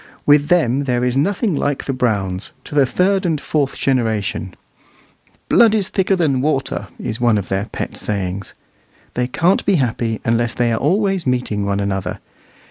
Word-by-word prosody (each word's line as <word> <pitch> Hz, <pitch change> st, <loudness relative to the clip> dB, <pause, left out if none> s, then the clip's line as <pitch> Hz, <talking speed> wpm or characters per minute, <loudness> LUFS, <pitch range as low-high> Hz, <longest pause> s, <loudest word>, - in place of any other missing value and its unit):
With 145 Hz, 0 st, +5 dB
them 140 Hz, -6 st, +2 dB
there 125 Hz, -2 st, 0 dB
is 125 Hz, 0 st, 0 dB
nothing 195 Hz, -, +1 dB
like 145 Hz, 0 st, -1 dB
the 135 Hz, -, -2 dB
Browns, 100 Hz, -7 st, -1 dB
to -, -, -11 dB
the 140 Hz, -3 st, +4 dB
third 190 Hz, +6 st, +1 dB
and 165 Hz, -5 st, 0 dB
fourth 145 Hz, -1 st, -1 dB
generation. 110 Hz, -7 st, -1 dB, 0.9 s
"Blood 225 Hz, -2 st, +5 dB
is 205 Hz, -2 st, 0 dB
thicker 195 Hz, -1 st, +1 dB
than 145 Hz, -8 st, +1 dB
water," 140 Hz, -2 st, -1 dB
is 115 Hz, 0 st, -4 dB
one 120 Hz, -3 st, +3 dB
of 100 Hz, -, -4 dB
their 95 Hz, +1 st, -1 dB
pet 110 Hz, -, -5 dB
sayings. 95 Hz, -2 st, -3 dB, 0.6 s
They 125 Hz, 0 st, -1 dB
can't 175 Hz, +9 st, +2 dB
be 200 Hz, -, +2 dB
happy 115 Hz, -5 st, -1 dB
unless 115 Hz, +1 st, +1 dB
they 120 Hz, -1 st, +1 dB
are 110 Hz, -, 0 dB
always 195 Hz, +1 st, +1 dB
meeting 115 Hz, -5 st, -1 dB
one 100 Hz, 0 st, 0 dB
another. 100 Hz, -1 st, -2 dB
125 Hz, 170 wpm, -19 LUFS, 110-160 Hz, 0.9 s, With